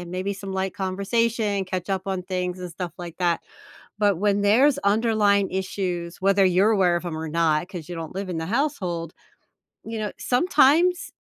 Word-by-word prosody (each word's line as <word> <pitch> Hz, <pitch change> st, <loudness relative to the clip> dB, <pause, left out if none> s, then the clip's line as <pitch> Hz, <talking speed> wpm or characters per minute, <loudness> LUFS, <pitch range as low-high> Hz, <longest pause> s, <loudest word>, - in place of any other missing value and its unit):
and 175 Hz, -1 st, -8 dB
maybe 185 Hz, +2 st, -2 dB
some 195 Hz, 0 st, -7 dB
light 190 Hz, 0 st, -2 dB
conversation, 200 Hz, +1 st, 0 dB
catch 185 Hz, 0 st, -4 dB
up 190 Hz, 0 st, -2 dB
on 190 Hz, -2 st, -2 dB
things, 180 Hz, -1 st, -3 dB
and 180 Hz, -1 st, -6 dB
stuff 175 Hz, 0 st, -5 dB
like 175 Hz, -2 st, -8 dB
that, 175 Hz, -2 st, +1 dB, 0.6 s
but 205 Hz, -4 st, +2 dB
when 205 Hz, 0 st, +1 dB
there's 260 Hz, +8 st, +4 dB
underlying 205 Hz, -3 st, +2 dB
issues, 185 Hz, -2 st, -3 dB
whether 195 Hz, 0 st, +4 dB
you're 185 Hz, +4 st, +4 dB
aware 180 Hz, -4 st, +3 dB
of 170 Hz, -, -4 dB
'em 165 Hz, -, -4 dB
or 160 Hz, 0 st, -4 dB
not, 165 Hz, +1 st, +1 dB
'cause 175 Hz, -5 st, -8 dB
you 175 Hz, -, -5 dB
don't 165 Hz, 0 st, -7 dB
live 195 Hz, 0 st, -4 dB
in 175 Hz, -, -3 dB
the 160 Hz, -, -3 dB
household, 185 Hz, -, -2 dB, 0.7 s
you 225 Hz, 0 st, -5 dB
know, 210 Hz, -1 st, -3 dB
sometimes 330 Hz, +5 st, +3 dB
190 Hz, 185 wpm, -24 LUFS, 175-210 Hz, 0.7 s, there's